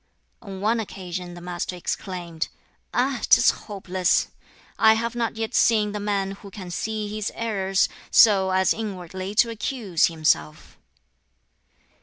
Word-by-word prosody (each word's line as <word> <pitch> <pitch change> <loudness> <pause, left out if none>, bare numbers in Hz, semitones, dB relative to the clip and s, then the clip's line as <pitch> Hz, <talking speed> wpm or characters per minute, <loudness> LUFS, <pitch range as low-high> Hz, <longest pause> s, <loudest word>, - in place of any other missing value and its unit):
On 195 -4 -8
one 225 +3 +2
occasion 180 -4 -6
the 175 - -10
Master 175 +1 -4
exclaimed, 175 -2 -4 0.4
"Ah, 250 0 0
'tis - - +7
hopeless! 185 -3 -1 0.5
I 220 0 +7
have 230 +1 -2
not 230 -2 -1
yet 225 0 -3
seen 215 -2 +3
the 210 - -4
man 200 -1 -1
who 200 +1 -10
can 185 -2 -9
see 215 +3 -3
his 215 -1 -3
errors, 195 -4 +1 0.2
so 195 -4 +6
as 190 0 +3
inwardly 190 -2 -6
to 230 +2 +4
accuse 210 -6 0
himself." 155 - -1
195 Hz, 135 wpm, -24 LUFS, 180-220 Hz, 0.5 s, tis